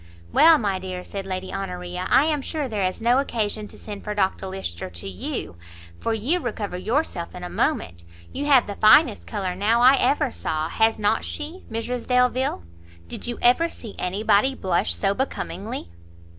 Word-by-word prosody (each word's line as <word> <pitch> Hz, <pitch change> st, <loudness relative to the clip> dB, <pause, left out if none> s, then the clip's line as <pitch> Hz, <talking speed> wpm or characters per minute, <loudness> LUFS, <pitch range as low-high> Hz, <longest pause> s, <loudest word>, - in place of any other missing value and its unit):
"Well, 325 Hz, -1 st, +7 dB
my 200 Hz, -7 st, -1 dB
dear," 185 Hz, -1 st, -6 dB
said 195 Hz, 0 st, -6 dB
Lady 185 Hz, 0 st, -4 dB
Honoria, 180 Hz, -1 st, -4 dB
"I 285 Hz, -, +5 dB
am 305 Hz, -2 st, 0 dB
sure 295 Hz, 0 st, -3 dB
there 210 Hz, -5 st, -2 dB
is 185 Hz, -, -5 dB
no 240 Hz, +3 st, +4 dB
occasion 215 Hz, -5 st, -2 dB
to -, -, -15 dB
send 205 Hz, -2 st, -8 dB
for 210 Hz, -1 st, -4 dB
Dr 190 Hz, -1 st, 0 dB
Lyster 95 Hz, -, -5 dB
to 85 Hz, +1 st, -8 dB
you, 90 Hz, -2 st, -5 dB, 0.4 s
for -, -, -1 dB
you 240 Hz, +11 st, +1 dB
recover 215 Hz, -, -4 dB
yourself 190 Hz, -, -2 dB
in 180 Hz, -, -8 dB
a 180 Hz, -, -6 dB
moment; 85 Hz, 0 st, -1 dB, 0.3 s
you 285 Hz, -, -3 dB
have 270 Hz, -4 st, +6 dB
the 205 Hz, -, -5 dB
finest 215 Hz, +9 st, +5 dB
colour 195 Hz, -4 st, -2 dB
now 210 Hz, +5 st, +2 dB
I 260 Hz, +3 st, +7 dB
ever 290 Hz, -2 st, +2 dB
saw; 155 Hz, 0 st, -3 dB
has 225 Hz, +3 st, +2 dB
not 210 Hz, +1 st, +1 dB
she, 320 Hz, +5 st, -6 dB
Mrs 235 Hz, +2 st, -3 dB
Delvile? 250 Hz, -, +2 dB, 0.4 s
did -, -, -5 dB
you 240 Hz, -, -3 dB
ever 250 Hz, +8 st, +4 dB
see 225 Hz, -9 st, -9 dB
anybody 205 Hz, +7 st, +2 dB
blush 175 Hz, -, 0 dB
so 140 Hz, -, +1 dB
becomingly?" 200 Hz, -, -4 dB
210 Hz, 180 wpm, -24 LUFS, 185-250 Hz, 0.4 s, Well